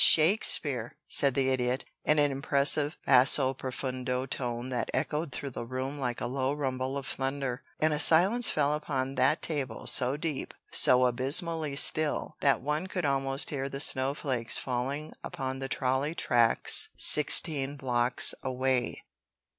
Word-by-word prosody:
"Shakespeare!" 155 - +4
said 140 -3 0
the 135 -1 0
Idiot, 125 0 -2 0.2
in 150 - +2
an 145 -1 +2
impressive 140 +3 +1
basso 130 +1 +5
profundo 130 -1 -5
tone 125 -2 -5
that 125 - -4
echoed 150 0 -3
through 135 +2 -6
the 120 - -7
room 130 +3 -5
like 125 -3 -4
a - - -4
low 130 +2 -2
rumble 130 -2 -4
of 140 - -6
thunder. 135 -1 -4 0.2
And 155 0 +1
a 150 - -2
silence 190 +10 +4
fell 145 -1 0
upon 135 -3 -4
that 135 +4 +1
table 135 -8 -4
so 130 +3 +2
deep, 155 -3 -5 0.2
so 125 0 +4
abysmally 145 +5 0
still, 155 +1 +2
that 140 -1 +1
one 150 +6 -3
could 185 -3 -4
almost 135 -1 +1
hear 135 -2 -4
the 135 - -7
snowflakes 130 -4 +1
falling 135 +4 -4
upon 130 -1 -5
the 135 0 -5
trolley 135 +5 -2
tracks 120 -6 +2
sixteen 145 -2 +3
blocks 125 -2 +2
away. 130 -1 -2
135 Hz, 145 wpm, -28 LUFS, 130-150 Hz, 0.2 s, basso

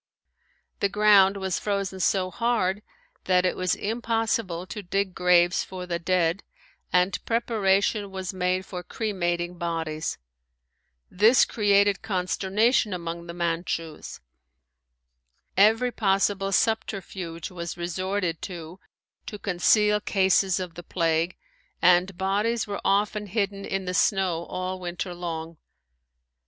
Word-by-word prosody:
The 200 - +1
ground 200 -1 +5
was 190 -2 -2
frozen 195 -2 -2
so 185 0 +1
hard 215 -4 0 0.4
that 180 -1 +3
it 180 - +1
was 185 -1 0
impossible 225 -5 -1
to 210 +3 -7
dig 195 0 -1
graves 180 0 +3
for 185 -1 -7
the 170 -1 -3
dead 170 +1 +1 0.5
and 180 +2 +2
preparation 210 -3 +1
was 190 -1 -5
made 185 0 0
for 180 -2 -6
cremating 175 -3 -2
bodies. 165 -2 -3 0.9
This 220 +7 +5
created 205 -2 +2
consternation 205 +3 +1
among 170 0 -6
the 170 - -7
Manchus. 165 -2 -3 1.4
Every 225 +5 +4
possible 195 -2 +1
subterfuge 190 -6 -2
was 170 -1 -6
resorted 180 0 -2
to 175 0 -8 0.5
to 210 - -6
conceal 210 +2 +3
cases 190 -2 +2
of 180 -2 -5
the 175 - -8
plague 165 0 0 0.4
and 180 +1 +4
bodies 205 +5 0
were 205 -1 -5
often 205 +1 +1
hidden 200 -1 -2
in 195 -1 -3
the 180 - -3
snow 180 -3 +1
all 185 0 -4
winter 180 0 -4
long. 165 -2 -5
190 Hz, 120 wpm, -26 LUFS, 175-205 Hz, 1.4 s, ground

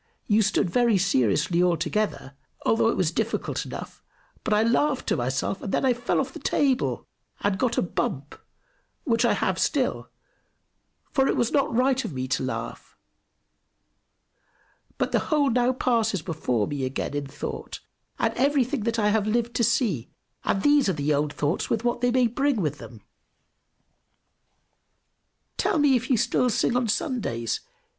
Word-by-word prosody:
You 215 0 +3
stood 210 -2 +1
very 235 +3 +3
seriously 170 - +2
all 175 -2 +3
together, 210 -11 -2 0.3
although 225 0 +3
it - - -1
was 175 -4 +1
difficult 225 +5 -2
enough; - - -8 0.4
but - - -3
I 210 +1 +4
laughed 260 +4 +1
to - - +2
myself, 130 +9 -2
and 195 - -4
then - - +1
I 255 - +4
fell 240 0 -1
off 265 -1 -2
the - - -8
table, 270 -2 0 0.4
and 200 -2 0
got 245 -2 0
a - - +3
bump, 145 -5 -3 0.7
which 230 -3 +2
I - - +3
have - - -1
still - - 0 1.0
for 270 -2 +2
it - - +1
was 235 - +1
not 280 -2 +1
right 260 +3 +2
of - - -5
me 130 0 -3
to - - 0
laugh. 130 0 -5 2.0
But - - -1
the - - +3
whole 290 -4 +3
now 245 +1 +2
passes 225 -8 0
before 125 - -1
me 140 +2 -4
again 130 +2 -3
in 145 -1 -3
thought, 140 +2 -6 0.4
and - - 0
everything 275 0 +1
that 230 -1 0
I 210 -2 +2
have 215 -1 +1
lived 235 +2 0
to 235 - +2
see; 210 - +1 0.3
and 195 - 0
these 290 -6 +4
are - - +1
the 150 -1 0
old 145 +1 0
thoughts, 150 +5 -1
with 225 0 0
what 240 0 0
they 245 - +3
may 250 0 +3
bring 270 +4 +1
with 150 -5 -2
them. 115 -4 -11 2.6
"Tell - - +1
me 290 -3 +4
if 250 +1 -2
you 255 - +3
still 250 +3 +2
sing 235 +1 +1
on 250 -1 +1
Sundays? 160 - -2
225 Hz, 170 wpm, -25 LUFS, 155-250 Hz, 2.6 s, I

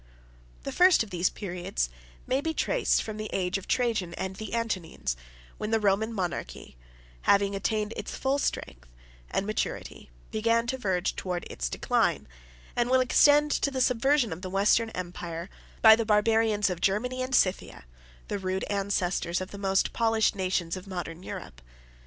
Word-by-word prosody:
The - - -4
first 360 -7 +5
of 215 - -12
these 175 0 +1
periods 175 - -3 0.4
may 265 +2 0
be 320 +1 -2
traced - - +1
from 215 -1 -6
the 215 0 -5
age 185 +1 0
of 190 - -13
Trajan 225 -8 0
and 190 0 -4
the 215 +3 -5
Antonines, 185 - -2 0.4
when 210 - -3
the 225 0 +2
Roman 210 +2 +1
monarchy, 185 - -4 0.5
having 200 0 +4
attained 210 +2 -1
its - - -5
full 270 +1 0
strength - - -3 0.4
and 195 - -1
maturity, 215 - -4 0.2
began 230 +2 +2
to 260 +2 -2
verge 190 -5 0
towards 180 -2 -3
its - - -3
decline; - - 0 0.5
and 240 0 +1
will 260 0 +5
extend 290 +3 +5
to 280 - +1
the 265 -1 -3
subversion 255 - +2
of 170 - -9
the 185 - -5
Western 205 +4 +3
Empire, 175 -2 -6 0.3
by 220 -1 +10
the 230 - -1
barbarians 215 -1 +2
of 175 -1 -5
Germany 250 +6 0
and 255 0 0
Scythia, 185 - 0 0.4
the 205 - -3
rude 190 0 -2
ancestors 190 -3 0
of 185 0 -6
the 200 - -8
most 195 -1 +1
polished 225 -1 +2
nations 185 -3 -1
of 185 +1 -9
modern 175 -3 -5
Europe. - - -8
205 Hz, 165 wpm, -28 LUFS, 185-230 Hz, 0.5 s, by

